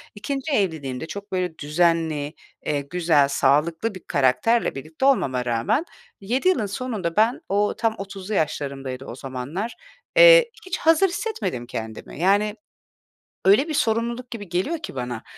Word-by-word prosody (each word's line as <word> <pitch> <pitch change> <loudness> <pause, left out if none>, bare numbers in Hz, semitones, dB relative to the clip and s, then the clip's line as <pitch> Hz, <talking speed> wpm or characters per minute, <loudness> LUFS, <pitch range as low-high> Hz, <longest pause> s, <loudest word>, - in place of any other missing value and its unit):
2'nci 275 +7 -4
evliliğimde 160 - -1
çok 200 +4 -8
böyle 180 -3 -2
düzenli, 155 -1 +1 0.3
eee, 145 -2 0
güzel, 155 -2 +2
sağlıklı 160 +9 +1
bir 185 - -10
karakterle 145 - +2
birlikte 155 - -4
olmama 130 - +2
rağmen 200 - 0 0.4
7 245 - 0
yılın 245 - +1
sonunda 200 -5 -3
ben 225 +3 +3
o 205 +1 +2
tam 225 -1 0
30'lu 195 +1 -6
yaşlarımdaydı 135 -5 -2
o 120 - -7
zamanlar, 135 - -5 0.4
eee, - - +8
hiç 365 -1 -3
hazır 325 +4 +4
hissetmedim 225 - -3
kendimi. 110 +3 -7
Yani, 205 +4 +2 0.9
öyle 215 - +5
bir 310 - -3
sorumluluk 235 0 -1
gibi 205 -6 -7
geliyor 190 - -1
ki 295 - -8
bana, 125 -2 -4
185 Hz, 140 wpm, -23 LUFS, 145-235 Hz, 0.9 s, eee